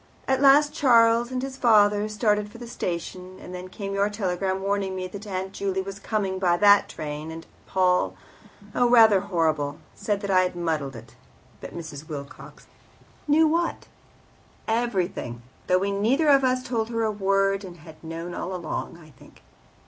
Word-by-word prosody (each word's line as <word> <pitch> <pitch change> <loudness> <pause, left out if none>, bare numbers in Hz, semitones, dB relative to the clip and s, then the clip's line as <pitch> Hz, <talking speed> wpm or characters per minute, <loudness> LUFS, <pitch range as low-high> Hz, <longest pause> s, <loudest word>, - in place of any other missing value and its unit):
At 265 0 +1
last 290 +2 +6
Charles 235 -2 +4
and 255 0 -3
his 270 0 -5
father 210 -3 +4
started 210 -1 0
for 235 - -12
the 240 0 -9
station, 185 -2 -5
and 180 - -10
then 180 0 -7
came 195 +1 -6
your 200 +1 +1
telegram 190 -2 -2
warning 195 -1 -1
me 185 0 -4
that 200 +3 -9
Aunt 190 0 -4
Juley 190 -1 -2
was 195 0 -8
coming 195 -3 -2
by 175 -2 +2
that 205 +1 +5
train, 150 +1 -6
and 165 0 -8 0.2
Paul 180 -1 +1 0.6
oh, 245 -1 +2
rather 225 -4 +7
horrible 160 -7 -1 0.2
said 205 -2 -2
that 200 -2 -3
I 185 -1 +5
had 180 -1 -1
muddled 155 -6 -2
it. 115 0 -12 0.5
But - - -9
Mrs. 155 -2 -8
Wilcox 140 -2 -9 0.6
knew." 300 +2 +4
"Knew - - +4
what?" 335 +1 -1 0.8
"Everything; 190 - -2 0.2
though 180 - +4
we 200 +2 -1
neither 245 +10 +2
of 275 -1 +5
us 255 0 +1
told 230 -3 -2
her 230 -1 -1
a 220 - +1
word, 195 0 +1
and 180 -2 -10
had 160 0 -15
known 165 +2 -6
all 185 +1 -4
along, 170 -1 -5
I 155 -2 -16
think." 130 - -19
195 Hz, 180 wpm, -25 LUFS, 175-225 Hz, 0.8 s, rather